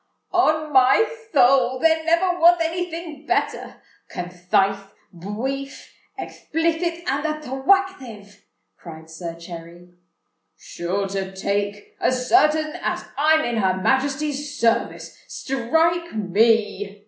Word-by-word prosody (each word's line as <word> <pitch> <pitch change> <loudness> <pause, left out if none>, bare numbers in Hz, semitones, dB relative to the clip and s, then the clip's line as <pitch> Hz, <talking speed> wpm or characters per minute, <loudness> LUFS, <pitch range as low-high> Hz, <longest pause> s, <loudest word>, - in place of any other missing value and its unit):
"On 310 -4 +2
my 260 +11 +5 0.3
thoul, 260 -2 +4
there 320 +3 +2
never 350 +2 +1
wath 345 +1 +6
any 345 +2 -1
thing 325 -3 -8
better—conthith, 180 - -5 0.6
bwief, 250 +10 -5 0.3
ekthplithit, 335 +1 -2
and 275 +2 0
attwactive!" 270 - -1 0.4
cried 160 -1 -11
Sir 165 0 -7
Cherry. 170 +1 -11 0.6
"Sure 190 +3 -3
to 190 -1 -4
take—as 205 +6 -2
certain 310 -3 +3
as 215 - -2
I'm 310 +3 +3
in 240 -1 -2
Her 190 -3 +1
Majesty's 285 +4 -1
service—strike 320 +7 -1
me!" 205 0 +1
265 Hz, 95 wpm, -22 LUFS, 200-320 Hz, 0.6 s, wath